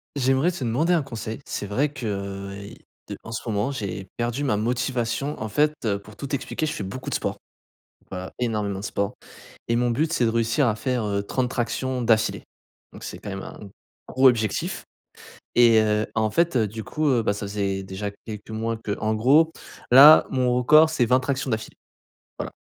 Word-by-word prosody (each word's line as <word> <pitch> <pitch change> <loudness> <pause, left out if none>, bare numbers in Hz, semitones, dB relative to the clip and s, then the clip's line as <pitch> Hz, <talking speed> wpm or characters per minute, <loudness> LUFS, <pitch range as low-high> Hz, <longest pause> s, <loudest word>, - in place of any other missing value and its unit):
J'aimerais 135 +4 +2
te 170 - -7
demander 130 +9 +1
un 170 -3 +3
conseil. 115 -4 -6
C'est - - -4
vrai 125 +9 0
que, 135 -4 -8
heu, 100 0 -5 0.3
de - - -5
en 110 - -8
ce 115 - -5
moment, 105 +3 0
j'ai 100 -7 -5
perdu 120 +4 -1
ma 125 -7 +1
motivation. 125 +4 -2
En 110 - -3
fait, 150 +8 +2
heu, 100 -2 +1
pour 105 +1 -15
tout 140 +4 -5
expliquer, 155 +3 -2
je 150 - -2
fais - - -5
beaucoup 130 +7 -7
de - - -2
sport, - - -2 0.7
voilà, 95 0 -6
énormément 105 -5 -1
de - - -8
sport 100 -1 -2 0.5
et 115 - +2
mon 120 0 +1
but, 155 +7 0
c'est 125 - +2
de 115 - +2
réussir 115 +4 +1
à 110 - +2
faire, 125 0 -1
heu, 100 -1 -1
30 125 +5 -1
tractions 130 +1 -2
d'affilée, 115 -2 +2 0.5
donc - - -11
c'est - - -7
quand - - -8
même 95 0 -5
un - - -9 0.5
gros 130 +1 +5
objectif 110 -4 -1 0.7
et 115 -2 +6
heu, 105 0 +1
en 110 -1 +1
fait, 170 +4 +1
heu 110 -3 +3
du 110 +2 -7
coup, 155 0 -2
heu, 125 -4 +3
bah, 105 -2 0
ça 100 0 -5
faisait 100 -1 -2
déjà 95 +2 -5 0.2
quelques 105 -2 -8
mois 115 +1 -2
qu'en 110 0 -2
gros, 145 +9 +4 0.4
là, 140 +5 +9
mon 125 -2 +1
record, 155 +6 +6
c'est 145 -6 +2
20 125 +2 +3
tractions 135 +1 -2
d'affilée, 110 -1 -4 0.6
voilà. - - -4
115 Hz, 200 wpm, -24 LUFS, 105-130 Hz, 0.7 s, là